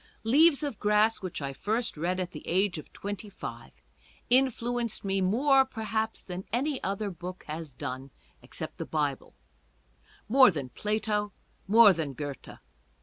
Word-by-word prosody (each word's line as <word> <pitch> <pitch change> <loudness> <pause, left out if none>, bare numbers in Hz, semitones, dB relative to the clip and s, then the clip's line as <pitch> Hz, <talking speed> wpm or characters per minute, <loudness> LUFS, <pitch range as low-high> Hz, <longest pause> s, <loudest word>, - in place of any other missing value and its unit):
"Leaves 295 +6 +5
of 280 -8 -3
Grass," 210 +1 +3
which 185 -6 -5
I 140 0 -3
first 220 - -2
read 175 +4 -1
at 180 -1 -3
the 150 - -10
age 185 -1 +1
of 150 - -12
twenty 205 +1 -6
five, 195 - -8 0.6
influenced 245 -3 +1
me 195 0 0
more 265 +8 +4
perhaps 220 -3 -3
than 180 0 -6
any 265 +4 -1
other 200 +1 -2
book 180 +1 -8
has 155 0 -6
done, 130 +1 -6 0.3
except - - -7
the - - -3
Bible; - - -2 0.9
more 260 +1 +7
than 145 -8 -4
Plato, 210 - -1 0.4
more 215 0 +8
than 155 -5 -3
Goethe. 140 +1 -7
205 Hz, 145 wpm, -29 LUFS, 175-230 Hz, 0.9 s, more